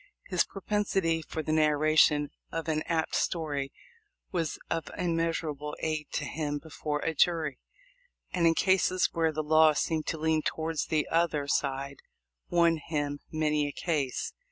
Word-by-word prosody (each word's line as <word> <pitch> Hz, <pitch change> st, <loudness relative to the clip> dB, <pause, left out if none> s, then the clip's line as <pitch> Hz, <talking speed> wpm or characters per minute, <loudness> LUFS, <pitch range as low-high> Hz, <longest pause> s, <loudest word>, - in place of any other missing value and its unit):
His -, -, +3 dB
pro 195 Hz, -, -10 dB
pensity 195 Hz, -6 st, +1 dB
for 160 Hz, -, -5 dB
the 155 Hz, -, -2 dB
narration 150 Hz, -1 st, +4 dB, 0.2 s
of 165 Hz, -1 st, -3 dB
an 155 Hz, -1 st, +1 dB
apt 165 Hz, -2 st, 0 dB
story 145 Hz, -5 st, -1 dB, 0.6 s
was 165 Hz, -4 st, -1 dB
of 165 Hz, -3 st, -2 dB
im 170 Hz, -2 st, 0 dB
measurable 155 Hz, -3 st, -2 dB
aid 155 Hz, -2 st, -2 dB
to -, -, -1 dB
him 145 Hz, -1 st, -2 dB
before 150 Hz, -1 st, -4 dB
a 165 Hz, -, -1 dB
jury, 160 Hz, -4 st, +1 dB, 0.7 s
and 170 Hz, -2 st, +3 dB
in 165 Hz, -, +4 dB
cases 185 Hz, 0 st, +3 dB
where 165 Hz, -1 st, +2 dB
the 155 Hz, 0 st, -2 dB
law 155 Hz, 0 st, +5 dB
seemed 155 Hz, +1 st, -1 dB
to 160 Hz, -, -1 dB
lean 160 Hz, 0 st, +1 dB
towards 160 Hz, 0 st, -2 dB
the 155 Hz, -2 st, +1 dB
other 165 Hz, -4 st, +1 dB
side 140 Hz, -1 st, -1 dB, 0.5 s
won 170 Hz, -1 st, +4 dB
him 145 Hz, -2 st, -3 dB
many 150 Hz, -2 st, +1 dB
a -, -, -3 dB
case. 145 Hz, -5 st, -2 dB
155 Hz, 155 wpm, -29 LUFS, 150-165 Hz, 0.7 s, law